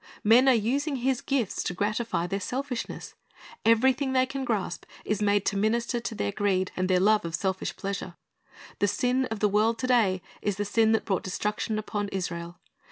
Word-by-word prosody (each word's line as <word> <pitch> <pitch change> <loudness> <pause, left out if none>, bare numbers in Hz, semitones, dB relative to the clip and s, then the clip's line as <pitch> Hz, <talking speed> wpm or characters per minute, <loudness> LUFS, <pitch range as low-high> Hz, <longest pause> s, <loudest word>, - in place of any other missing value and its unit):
Men 240 +5 +6
are 260 - +6
using 275 +7 0
His 255 0 0
gifts 270 -7 -1
to 180 - -3
gratify 210 -1 -1
their 195 +3 -2
selfishness. 255 +2 -4 0.5
Everything 260 +4 +3
they 255 0 +4
can 270 0 -4
grasp 205 -8 -2 0.2
is 210 0 -1
made 205 -1 +2
to 200 - 0
minister 235 +4 0
to 230 -1 -5
their 100 - -1
greed 190 - 0
and 185 0 -1
their 185 -1 +4
love 210 +3 +4
of 170 0 -3
selfish 190 0 -2
pleasure. 195 -3 -5 0.6
The 205 - +3
sin 250 +5 +1
of 225 -4 -5
the 210 - +5
world 215 +3 +2
to 225 - -3
day 210 -8 +2 0.2
is 205 -2 -1
the 205 +1 -2
sin 220 +2 +3
that 225 - +1
brought 190 -4 0
destruction 210 +3 -2
upon 205 -1 -3
Israel. 175 -3 -4
215 Hz, 190 wpm, -27 LUFS, 195-245 Hz, 0.6 s, Men